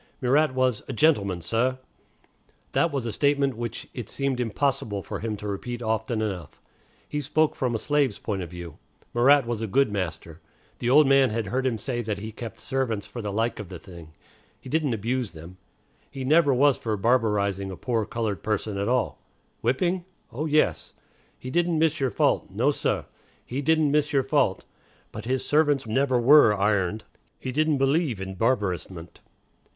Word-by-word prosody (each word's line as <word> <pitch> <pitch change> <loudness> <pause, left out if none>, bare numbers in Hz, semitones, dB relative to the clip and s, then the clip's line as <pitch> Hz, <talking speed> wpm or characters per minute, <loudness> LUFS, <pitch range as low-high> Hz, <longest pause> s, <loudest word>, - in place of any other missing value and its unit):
Murat 135 +2 +2
was 130 -4 +1
"a - - -4
gentleman, 100 - +2
sah." 115 +9 0 1.0
That 170 - +2
was 135 -4 -2
a 115 - -2
statement 140 +2 +1
which 115 0 -5
it 120 -5 -6
seemed 135 -2 -2
impossible 115 -4 -1
for - - -5
him 110 -1 -3
to 105 - -7
repeat 120 +4 -4
often 110 0 -1
enough. 95 -7 -5 0.5
He 150 - -3
spoke 155 +2 +1
from 125 -4 -1
a - - +1
slave's 140 -2 +1
point 100 -3 -3
of 85 - -6
view. 85 -2 -9 0.3
Murat 135 +3 +5
was 115 -2 -3
a 110 - -2
good 135 +3 +2
master. 85 -4 -4 0.4
The 120 - -1
old 150 +4 +7
man 135 -1 +5
had 110 0 -2
heard 130 +7 -1
him 120 -3 -1
say 120 +3 -3
that 105 -3 -3
he 110 +2 -6
kept 115 -1 -8
servants 130 -6 -2
"for 120 - -7
the 105 -2 -4
like 115 +3 -1
of 100 -4 -7
the 90 - -7
thing." 85 -2 -13 0.4
He - - -11
didn't 150 -4 +1
abuse 115 +1 -2
them. 85 +3 -11 0.5
He 135 -2 -6
"never 150 +2 +4
was 135 +1 +4
for 110 -2 -2
barbarizing 100 -4 +1
a 95 - -7
poor 115 -4 -1
colored 110 -4 -3
person 105 -1 -2
at 100 - -1
all." 125 +1 0 0.4
Whipping? 175 +9 0 0.3
Oh, 145 +7 -3
yes. 155 0 +1 0.4
"He 130 - -7
didn't 175 +1 +1
miss 160 0 +2
your 135 -2 +1
fault. 105 - +1
No, 120 +9 +1
sah, - - -1 0.4
he 130 +3 -3
didn't 155 0 +3
miss 150 0 +2
your 135 -1 +3
fault." 135 -7 +1 0.5
But 110 - -8
his 130 +1 -1
servants 145 -3 +2
never 130 +3 +1
were 125 -3 +7
"ironed." 105 0 +1 0.3
He 130 - -5
"didn't 155 +2 +2
believe 135 - +1
in 95 0 -5
barbarousment." 95 -6 -2
120 Hz, 180 wpm, -25 LUFS, 105-140 Hz, 1.0 s, old